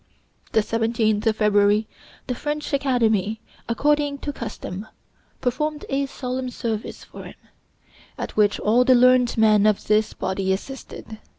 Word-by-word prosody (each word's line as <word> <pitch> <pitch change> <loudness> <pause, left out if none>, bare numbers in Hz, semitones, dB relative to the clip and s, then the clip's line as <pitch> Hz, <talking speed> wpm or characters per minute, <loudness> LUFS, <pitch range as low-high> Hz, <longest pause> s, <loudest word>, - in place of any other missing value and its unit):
The 220 - +4
17th 225 -1 0
of 220 - +3
February 210 0 +3 0.4
the 250 - -2
French 295 +4 -4
Academy, 225 -6 +1 0.3
according 290 +3 +1
to 290 - -3
custom, 215 -4 -7 0.5
performed 300 +4 -2
a 275 0 0
solemn 255 -1 -4
service 225 -3 -4
for - - -11
him, - - -11 0.8
at - - -6
which 210 -1 +3
all 230 +4 +3
the 255 0 +5
learned 250 -1 +4
men 215 -1 +5
of 210 -2 +1
this 215 0 +2
body 190 0 -2
assisted. 220 0 -8
230 Hz, 135 wpm, -23 LUFS, 215-260 Hz, 0.8 s, the